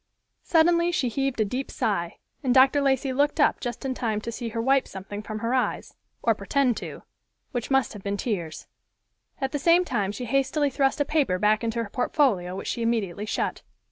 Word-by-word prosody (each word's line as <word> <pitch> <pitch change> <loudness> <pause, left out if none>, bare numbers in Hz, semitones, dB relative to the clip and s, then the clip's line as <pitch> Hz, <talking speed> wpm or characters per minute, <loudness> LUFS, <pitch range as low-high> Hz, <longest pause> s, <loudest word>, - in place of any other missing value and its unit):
Suddenly 340 +1 +3
she 275 -8 0
heaved 270 0 -1
a - - +3
deep 255 +6 -3
sigh, 170 -6 -2 0.2
and 255 -2 +1
Dr. 265 +2 +6
Lacey 270 -1 +1
looked 290 +4 +1
up 295 - +3
just 240 +2 -5
in 265 - -1
time 225 -4 -1
to 230 - -5
see 235 0 -5
her 230 - -4
wipe 270 +3 +2
something 195 +2 -7
from 215 +1 -6
her 235 - 0
eyes, 260 - -1 0.3
or - - +4
pretend 275 -4 +1
to, - - -7 0.5
which 245 -4 -3
must 270 -3 +2
have 205 - -9
been 200 +1 -2
tears. 175 -9 -3 0.7
At 270 -1 -1
the 290 - -2
same 340 +4 +4
time 205 - -1
she 245 +4 -6
hastily 275 +3 +1
thrust 270 +2 +1
a - - +2
paper 280 -13 +1
back 210 +3 +2
into 230 0 -1
her 210 - -8
portfolio, 220 - +1
which 195 - -6
she 235 - -2
immediately 215 -4 -1
shut. - - -2
245 Hz, 205 wpm, -26 LUFS, 210-275 Hz, 0.7 s, Dr